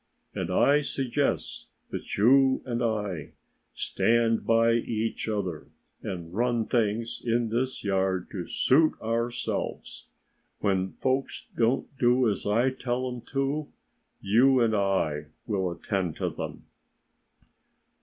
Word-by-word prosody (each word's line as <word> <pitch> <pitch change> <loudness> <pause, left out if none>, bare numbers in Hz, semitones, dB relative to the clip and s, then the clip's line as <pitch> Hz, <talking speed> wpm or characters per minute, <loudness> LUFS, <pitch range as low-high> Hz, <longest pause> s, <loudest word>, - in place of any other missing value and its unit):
And 90 -2 -3
I 140 +10 +4
suggest 135 0 -2 0.2
that - - -5
you 130 +5 +5
and 120 -2 -2
I 105 -8 -2 0.4
stand 115 -1 +1
by 115 0 +4
each 115 -1 -1
other 95 -7 -3 0.3
and 85 -2 -6
run 120 +1 +1
things 115 0 0
in 120 -1 +1
this 130 +3 -2
yard 95 -2 0
to - - -5
suit 155 +4 +3
ourselves. 115 +2 -3 0.5
When 95 -2 0
folks 130 +1 -2
don't 120 +4 0
do 125 0 +4
as 100 -2 -1
I 120 +6 +3
tell 130 0 -2
them 125 -1 -6
to, 140 +2 0 0.5
you 125 +6 +4
and 115 -2 +3
I 95 -7 0 0.2
will 95 -4 -1
attend 90 -1 -2
to - - -2
them." - - -6
115 Hz, 120 wpm, -27 LUFS, 100-125 Hz, 0.5 s, you